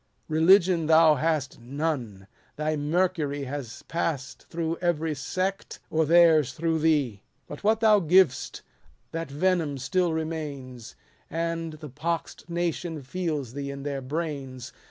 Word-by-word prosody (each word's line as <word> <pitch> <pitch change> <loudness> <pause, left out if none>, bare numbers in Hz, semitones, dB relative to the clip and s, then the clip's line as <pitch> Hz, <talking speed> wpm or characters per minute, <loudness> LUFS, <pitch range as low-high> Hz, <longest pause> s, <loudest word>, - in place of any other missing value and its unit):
Religion 170 +1 +4
thou 160 -1 +7
hast 150 -1 -1
none: 125 -6 -3 0.3
thy 155 +1 -1
mercury 150 -2 0
Has 135 -3 -6
pass'd 155 -6 -3
through 165 0 -2
eveiy 165 -3 0
sect, 185 +8 -3
or 160 -1 +2
theirs 160 -5 +5
through 160 +3 0
thee. 145 -10 +1 0.3
But 145 - -9
what 220 +2 +3
thou 215 -2 +6
giv'st, 180 -5 +3 0.5
that 165 -2 -4
venom 155 -1 0
still 175 +6 0
remains, 145 -7 -5 0.3
And 165 -1 -2
the 155 -1 -9
pox'd 165 +5 -4
nation 170 -2 -2
feels 150 -5 -3
thee 140 0 -4
in 140 0 -6
their 140 -1 -3
brains. 140 -3 -5
155 Hz, 130 wpm, -26 LUFS, 140-170 Hz, 0.5 s, thou